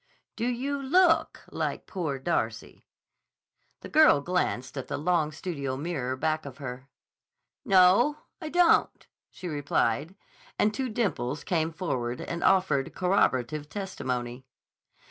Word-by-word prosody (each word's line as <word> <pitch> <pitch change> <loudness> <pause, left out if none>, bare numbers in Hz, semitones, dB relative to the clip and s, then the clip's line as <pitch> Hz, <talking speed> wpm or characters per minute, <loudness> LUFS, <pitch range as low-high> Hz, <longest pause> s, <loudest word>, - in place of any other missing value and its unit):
"Do 230 +2 -2
you 270 +3 -2
look 330 +5 +3
like - - -3
'Poor 160 -7 -3
Darcy'?" 170 +6 -3 0.9
The - - -8
girl 310 - +6
glanced 140 -5 -2
at 135 - -5
the - - -3
long 160 -1 +1
studio 140 -5 -4
mirror 135 -5 -3
back 155 +3 -1
of 140 -2 -9
her. 130 -1 -8 0.7
"No, 195 +7 +5 0.2
I 315 - -5
don't," 350 +1 +3 0.2
she 180 - -8
replied, 145 0 -1 0.4
and 210 - +2
two 260 +2 -2
dimples 150 - -2
came 165 -2 0
forward 125 -9 -3
and 170 0 -4
offered 180 -8 +2
corroborative 150 -6 +1
testimony. 130 -10 -4
160 Hz, 125 wpm, -27 LUFS, 135-195 Hz, 0.9 s, girl